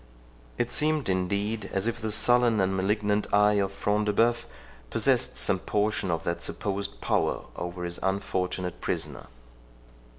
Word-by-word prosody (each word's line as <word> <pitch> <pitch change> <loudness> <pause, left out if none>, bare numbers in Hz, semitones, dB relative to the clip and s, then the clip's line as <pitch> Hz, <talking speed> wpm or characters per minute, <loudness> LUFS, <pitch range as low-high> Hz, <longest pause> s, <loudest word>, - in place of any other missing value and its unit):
It 120 0 -1
seemed 155 -5 +1
indeed 100 +4 -1
as 95 +1 -1
if 115 - -1
the 110 0 -2
sullen 120 0 +3
and 95 0 +1
malignant 105 +2 0
eye 105 0 +4
of 95 0 -1
Front 105 +2 0
de 105 - +1
Bœuf 115 +2 +2 0.4
possessed - - +1
some 95 - +1
portion 105 0 0
of 85 -1 -1
that 85 0 -2
supposed 100 0 -3
power - - 0
over 90 +1 -5
his 85 0 -1
unfortunate 90 -2 -2
prisoner. - - -3
100 Hz, 145 wpm, -27 LUFS, 95-110 Hz, 0.4 s, eye